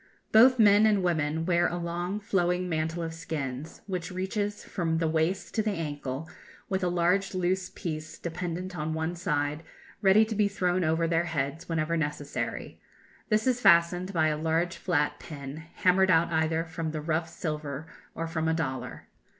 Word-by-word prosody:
Both 250 +4 +7
men 210 -1 +6
and 205 -3 +2
women 160 -2 0
wear 175 -1 +3
a 175 - -3
long 175 +3 -3
flowing 180 -3 0
mantle 165 0 -1
of 165 0 -4
skins, 150 -3 -5
which 180 -3 -4
reaches 205 +3 -2
from 165 -2 -1
the 165 0 +1
waist 160 +4 0
to 220 - +2
the 215 -1 0
ankle, 145 -3 -4 0.4
with 190 -1 -1
a - - +2
large 180 +3 +1
loose 185 0 0
piece 155 -2 -6
dependent 180 +2 -4
on 155 0 -2
one 160 +2 -1
side, 150 -4 -1 0.4
ready 205 +2 +6
to 220 - -4
be 210 -1 +3
thrown 185 -2 0
over 165 +1 +1
their 165 +1 +1
heads 160 +1 -3
whenever 165 0 0
necessary; 145 -2 -3 0.5
this 215 0 +2
is 250 -1 +1
fastened 175 +1 +4
by 160 -4 +2
a 150 - -1
large 165 +2 +1
flat 150 -5 0
pin, 140 -2 -8 0.2
hammered 185 +1 +4
out 170 -1 +4
either 160 +1 +1
from 160 0 -4
the 155 - -3
rough 160 +1 -1
silver 150 -3 -4 0.3
or 165 - -2
from 160 -1 -2
a 160 - +2
dollar. 130 -6 -4
170 Hz, 175 wpm, -28 LUFS, 160-185 Hz, 0.5 s, Both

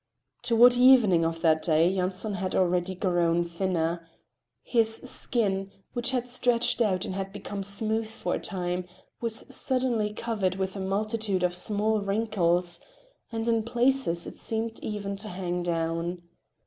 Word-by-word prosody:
Toward 240 +1 +6
evening 245 -9 +5
of 165 0 -2
that 160 -1 +3
day 160 +1 +3
Yanson 185 +3 -1
had 185 -1 -3
already 180 0 +1
grown 175 -2 +1
thinner. 170 -1 -2 0.5
His 225 -2 +3
skin, 200 -6 -1 0.2
which 240 +1 0
had 250 -2 -1
stretched 245 -1 +1
out 190 -5 +1
and - - -4
had 195 0 -4
become 200 0 -6
smooth 220 +3 +1
for 220 - -4
a - - -1
time, 180 -1 -3 0.4
was 230 -1 +2
suddenly 250 -5 +1
covered 210 -4 -2
with 190 0 -3
a - - -5
multitude 200 0 -1
of 180 -1 +1
small 210 +3 +1
wrinkles, 195 -4 0 0.5
and 225 0 -3
in 230 -1 +2
places 240 -6 +1
it - - -10
seemed 225 0 -3
even 200 -2 -4
to 210 +2 -5
hang 180 -1 -3
down. 170 +1 -2
195 Hz, 150 wpm, -27 LUFS, 180-225 Hz, 0.5 s, Toward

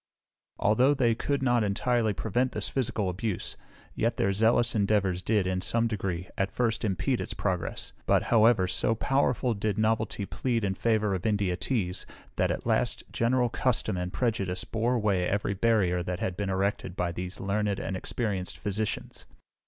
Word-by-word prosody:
Although 125 +7 +3
they 120 -4 +3
could 140 +4 -1
not 120 -3 +3
entirely 110 +2 +1
prevent 125 +5 -1
this - - -3
physical 120 -6 -1
abuse, 95 +2 -3 0.4
yet - - 0
their 100 - +2
zealous 115 +3 +3
endeavours 100 -4 +1
did, 105 -1 +1
in 90 0 -1
some 115 +4 +1
degree, 95 -5 -2
at 95 0 +1
first 115 -2 0
impede 95 -6 0
its - - -5
progress; - - -2 0.2
but, - - +4
however, 110 -4 +4
so 110 +4 +1
powerful 125 -1 +1
did 105 -1 -2
novelty 110 -2 0
plead 115 +1 -1
in 95 -1 +1
favour 110 0 +1
of 95 +3 -1
India 100 -4 +1
teas, 95 -3 -2 0.3
that, - - +2
at - - -3
last, - - +1
general 125 +1 +2
custom 115 -4 0
and 90 0 -3
prejudice 100 -6 -1
bore 115 +3 0
away 100 -6 +1
every 100 0 0
barrier 100 -4 +2
that 90 0 -3
had 90 - -2
been 100 0 -2
erected 95 -1 -1
by 90 -2 -1
these 90 +2 -6
learned 100 0 0
and 95 - -3
experienced 95 -1 -3
physicians. 105 +1 -4
105 Hz, 170 wpm, -28 LUFS, 95-115 Hz, 0.4 s, but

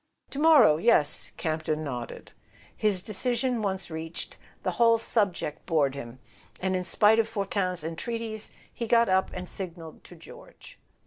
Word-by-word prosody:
.." - - -46
"To 280 - -5
morrow—yes," 230 - +4
Campton 155 -1 -2
nodded. 125 -5 -6 0.4
His 200 -4 +1
decision 240 +3 -1
once 190 -4 -3
reached, 160 +1 -6 0.3
the - - 0
whole 230 -1 +4
subject 200 -9 -1
bored 150 -6 +2
him, 130 -3 -8 0.4
and 190 0 0
in 185 - -1
spite 215 +4 +4
of 225 - +2
Fortin's 195 -5 -1
entreaties 220 +6 -3 0.2
he 235 - -4
got 235 -1 +4
up 190 0 +2
and 180 0 -6
signalled 170 -4 -8
to - - -13
George. - - -14
190 Hz, 145 wpm, -27 LUFS, 160-225 Hz, 0.4 s, morrow—yes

